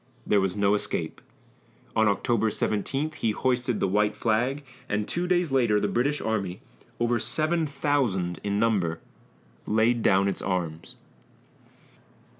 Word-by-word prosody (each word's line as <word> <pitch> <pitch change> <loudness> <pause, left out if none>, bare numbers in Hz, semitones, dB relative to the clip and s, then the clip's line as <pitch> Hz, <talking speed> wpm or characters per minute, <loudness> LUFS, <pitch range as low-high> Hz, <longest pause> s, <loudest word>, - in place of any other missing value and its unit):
There 100 - +3
was 95 0 -1
no 100 0 +3
escape. 105 - -2 0.7
On 110 -1 +4
October 110 +2 +1
17 135 +9 -1
he 135 -7 -1
hoisted 125 -1 0
the - - +1
white 105 +2 +1
flag, 120 +7 0 0.3
and 105 0 -1
two 175 +1 -2
days 175 -4 +1
later 120 -6 +3
the - - 0
British 140 +5 0
army, 100 -5 -2 0.4
over 120 0 +1
seven 160 +5 0
thousand 115 - 0
in 100 0 -1
number, 100 -7 +1 0.7
laid 115 +2 +2
down 95 -1 +3
its 100 - -2
arms. 85 -4 -3
110 Hz, 135 wpm, -26 LUFS, 100-130 Hz, 0.7 s, On